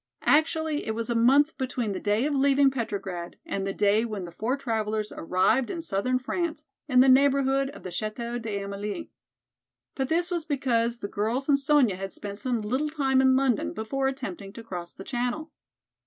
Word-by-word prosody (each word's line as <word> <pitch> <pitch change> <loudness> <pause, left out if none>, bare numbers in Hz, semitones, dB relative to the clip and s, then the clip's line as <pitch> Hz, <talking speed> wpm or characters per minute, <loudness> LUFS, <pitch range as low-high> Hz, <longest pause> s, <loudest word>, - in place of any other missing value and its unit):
Actually 315 0 +2
it 220 - -1
was 230 +1 -3
a - - 0
month 275 +7 +4
between 250 -4 -2
the 195 - -3
day 210 +4 +1
of 300 - 0
leaving 275 0 +4
Petrograd 195 -8 -4
and 195 0 -3
the - - -1
day 205 +2 +2
when 210 -5 -4
the 170 - -9
four 230 +10 -2
travelers 220 -4 -2
arrived 190 +9 +1
in 340 - -4
southern 255 -5 0
France 310 +3 -3 0.2
in 255 -3 +5
the 265 - +5
neighborhood 270 0 +4
of 285 - -12
the 185 - -6
Chateau 235 +4 -3
d'Amélie. 200 -2 -4 0.8
But 265 0 -2
this 345 +2 +1
was 345 -2 -1
because 245 -6 0
the 200 - -5
girls 225 +7 -2
and 280 -2 +4
Sonya 275 -9 +3
had 195 0 -5
spent 200 0 -7
some 245 -2 -1
little 260 +8 -1
time 270 -3 +2
in 260 0 +5
London 260 -5 +1
before 265 +5 -1
attempting 200 -7 -5
to 230 - -9
cross 175 -5 -6
the 195 - -10
channel. 250 +7 -3
245 Hz, 185 wpm, -27 LUFS, 210-275 Hz, 0.8 s, in